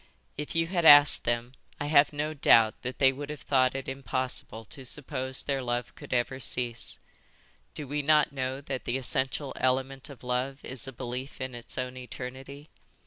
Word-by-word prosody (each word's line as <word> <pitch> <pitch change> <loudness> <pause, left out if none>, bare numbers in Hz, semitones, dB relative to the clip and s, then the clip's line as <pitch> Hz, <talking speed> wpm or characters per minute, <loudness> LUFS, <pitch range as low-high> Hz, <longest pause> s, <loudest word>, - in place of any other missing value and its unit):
"If 150 +2 -5
you 165 0 +3
had 175 0 -1
asked 145 -2 +8
them 120 +1 -1 0.3
I 145 - -2
have 145 -1 +5
no 150 +1 -3
doubt 115 -6 +4
that 125 +1 -5
they 135 -1 +5
would 140 +2 -7
have 150 -4 -7
thought 130 -1 +2
it 135 0 -5
impossible 130 -3 -3
to 135 +4 -8
suppose 130 0 -1
their 135 -2 -1
love 120 -1 -3
could - - -12
ever 125 +2 0
cease. 120 -2 -3 0.8
Do 150 - -4
we 145 +2 -1
not 150 0 +4
know 130 0 -3
that 135 -2 -5
the 120 - 0
essential 135 +2 +1
element 130 +1 -1
of 140 -3 -12
love 125 +3 -2
is 130 0 -1
a - - -5
belief 125 +2 -6
in 130 -1 -4
its 120 -1 -7
own 125 0 -3
eternity? 130 +3 -8
130 Hz, 185 wpm, -28 LUFS, 125-145 Hz, 0.8 s, asked